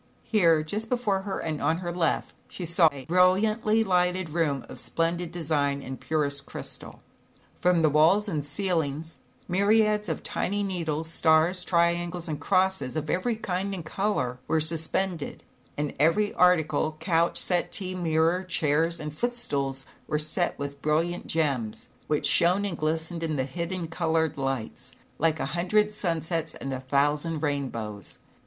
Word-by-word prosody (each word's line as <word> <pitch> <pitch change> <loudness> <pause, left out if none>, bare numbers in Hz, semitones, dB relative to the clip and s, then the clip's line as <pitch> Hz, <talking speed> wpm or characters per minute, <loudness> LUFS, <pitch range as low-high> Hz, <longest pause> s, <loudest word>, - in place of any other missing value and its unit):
Here, 165 -8 +3
just 210 +8 -4
before 215 -6 0
her 195 -1 -4
and 155 -2 -3
on 160 - +2
her 175 -1 -4
left, 170 -2 0
she 180 - -6
saw 170 -1 +4
a 135 -2 -9
brilliantly 210 - +3
lighted 180 -3 +1
room 150 -5 0
of - - -7
splendid 170 +1 -1
design 145 -4 -1
and 130 0 -7
purest 145 -3 -1
crystal. - - -8 0.6
From 175 -2 +3
the - - +6
walls 165 +8 +4
and 155 -7 -2
ceiling, 160 -2 -1 0.4
myriads 210 +3 +2
of - - -3
tiny 205 +2 -1
needles, 165 -5 -2
stars, 160 +3 +3
triangles 170 0 +1
and 150 -2 -3
crosses 185 -6 +1
ot 155 0 -2
every 230 +6 0
kind 195 -2 -2
and 170 -4 -7
color, 155 -10 -1
were 160 - +2
suspended 160 +1 -1 0.3
and 145 -1 -2
every 165 +8 +3
article, 160 -3 +3
couch, 165 0 +1
settee, 185 +1 -1
mirror, 170 0 +1
chairs 165 -1 +1
and 150 -1 -5
footstools 140 - -2 0.2
were 150 - 0
set 155 +4 -1
with 140 0 -6
brilliant 165 +3 0
gems, 135 -9 -1 0.2
which 150 -1 0
shone 180 +4 +4
and 180 -5 -4
glistened 160 +2 -1
in 160 -2 -1
the 130 -2 0
hidden 170 +4 -4
colored 160 -1 0
lights 135 -5 -4 0.3
like 160 0 +2
a - - -1
hundred 210 +5 +2
sunsets 165 -5 -2
and 135 - -5
a 130 - -3
thousand 145 +4 0
rainbows. 115 - -3
165 Hz, 150 wpm, -27 LUFS, 150-185 Hz, 0.6 s, the